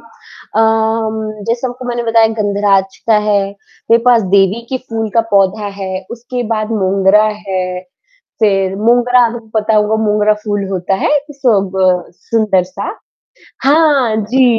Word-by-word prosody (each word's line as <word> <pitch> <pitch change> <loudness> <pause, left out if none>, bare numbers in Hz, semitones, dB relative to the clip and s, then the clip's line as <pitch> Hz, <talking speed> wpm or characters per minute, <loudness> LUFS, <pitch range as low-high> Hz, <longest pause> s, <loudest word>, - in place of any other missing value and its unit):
अ, 230 -1 -7 0.9
जैसे 235 +2 -1
आपको 255 0 -7
मैंने 240 -1 -3
बताया 225 -1 +3
गंधराज 200 -2 +1
का 225 -2 +4
है, 205 -1 +3 0.5
मेरे 230 0 +5
पास 240 -2 +4
देवी 195 +3 +3
की 260 - -2
फूल 225 -1 -2
का 230 - +5
पौधा 200 +1 +2
है, 190 0 -4
उसके 245 +1 -5
बाद 215 0 -2
मोगरा 195 0 +3 0.2
है। 185 -1 -2 0.6
फ़िर 195 -3 +2
मोगरा 245 +3 +3
आपको 230 -1 -6
पता 215 +1 0
होगा 210 +1 +2
मोगरा 210 0 +2
फूल 205 -2 -2
होता 190 0 -1
है, - - +2 0.2
सब 210 -9 0 0.3
अ, - - -20 0.2
सुंदर 215 -5 +2
सा 185 - -6 0.7
हाँ 280 -6 +3
जी, 235 +2 +2
215 Hz, 145 wpm, -14 LUFS, 195-235 Hz, 0.9 s, मेरे